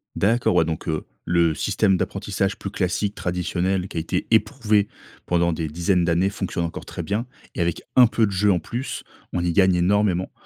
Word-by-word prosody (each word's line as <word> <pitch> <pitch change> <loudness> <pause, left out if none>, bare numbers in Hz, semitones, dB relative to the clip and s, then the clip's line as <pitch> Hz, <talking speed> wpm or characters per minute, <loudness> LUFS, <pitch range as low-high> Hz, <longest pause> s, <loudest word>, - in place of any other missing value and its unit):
D'accord. 110 +2 +2
Ouais, - - +4
donc, 80 0 -4
heu, 80 -1 -2 0.2
le 85 -2 +2
système 95 +5 +2
d'apprentissage 100 +1 -2
plus 100 - -4
classique 100 +2 -1
traditionnel 90 +2 -1
qui - - -8
a - - +2
été 80 - -2
éprouvé 110 -3 +2 0.4
pendant 85 -1 +2
des 80 0 -3
dizaines 85 +3 +1
d'années 85 +3 +2
fonctionne 95 -4 -3
encore 80 - -6
très - - -6
bien. 105 +4 -2 0.3
Et 85 - -1
avec 85 -1 -1
un 125 - +9
peu 115 -1 +2
de - - -4
jeu 100 +2 +3
en 90 - +2
plus, 120 - -5 0.3
on 90 - -1
y 90 - +1
gagne 95 +1 +4
énormément, 95 +1 +1
95 Hz, 195 wpm, -23 LUFS, 85-105 Hz, 0.4 s, un